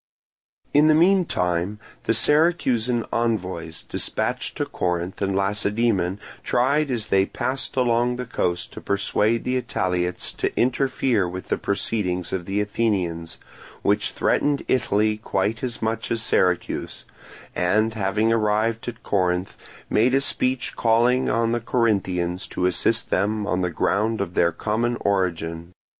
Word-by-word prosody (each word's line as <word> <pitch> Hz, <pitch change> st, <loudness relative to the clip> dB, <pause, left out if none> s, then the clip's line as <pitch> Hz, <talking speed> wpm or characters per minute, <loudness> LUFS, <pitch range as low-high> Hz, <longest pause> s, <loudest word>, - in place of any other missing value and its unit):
In 150 Hz, +2 st, +6 dB
the 155 Hz, -, +5 dB
meantime 105 Hz, -, +2 dB, 0.3 s
the 115 Hz, -, +2 dB
Syracusan 125 Hz, -6 st, +2 dB
envoys 95 Hz, -8 st, -2 dB
dispatched -, -, -2 dB
to -, -, 0 dB
Corinth 90 Hz, +1 st, -3 dB
and 95 Hz, -1 st, 0 dB
Lacedaemon 100 Hz, -1 st, 0 dB, 0.2 s
tried 140 Hz, +4 st, +2 dB
as 115 Hz, -5 st, -2 dB
they 95 Hz, 0 st, +3 dB
passed 130 Hz, +1 st, -3 dB
along 120 Hz, -1 st, +2 dB
the 125 Hz, 0 st, -4 dB
coast 90 Hz, -6 st, -2 dB
to -, -, -8 dB
persuade 105 Hz, +3 st, +1 dB
the 125 Hz, 0 st, 0 dB
Italiots 90 Hz, -4 st, -2 dB
to -, -, -2 dB
interfere 125 Hz, -5 st, +1 dB
with 90 Hz, +1 st, -7 dB
the -, -, +1 dB
proceedings 95 Hz, -3 st, -2 dB
of 90 Hz, -2 st, -2 dB
the 100 Hz, +1 st, 0 dB
Athenians, 95 Hz, -6 st, -1 dB, 0.5 s
which -, -, +2 dB
threatened 145 Hz, -1 st, +1 dB
Italy 110 Hz, -3 st, +1 dB
quite 105 Hz, +1 st, -1 dB
as 120 Hz, -3 st, -4 dB
much 115 Hz, +1 st, -2 dB
as 115 Hz, -1 st, 0 dB
Syracuse, 90 Hz, -5 st, 0 dB, 0.5 s
and 110 Hz, +5 st, +2 dB
having 110 Hz, +2 st, +1 dB
arrived 110 Hz, +2 st, 0 dB
at 120 Hz, -1 st, -6 dB
Corinth 90 Hz, -1 st, 0 dB, 0.3 s
made 120 Hz, +5 st, +3 dB
a 135 Hz, -, +3 dB
speech 130 Hz, -2 st, -1 dB
calling 120 Hz, +3 st, +3 dB
on 115 Hz, 0 st, +1 dB
the 120 Hz, 0 st, 0 dB
Corinthians 95 Hz, -7 st, 0 dB
to 90 Hz, -, -2 dB
assist 110 Hz, +5 st, +1 dB
them 105 Hz, +2 st, 0 dB
on 95 Hz, -2 st, 0 dB
the 90 Hz, -, 0 dB
ground 105 Hz, +6 st, 0 dB
of 95 Hz, -3 st, -3 dB
their 85 Hz, -1 st, +3 dB
common 115 Hz, +7 st, -1 dB
origin. 85 Hz, -3 st, -1 dB
105 Hz, 140 wpm, -23 LUFS, 90-120 Hz, 0.5 s, In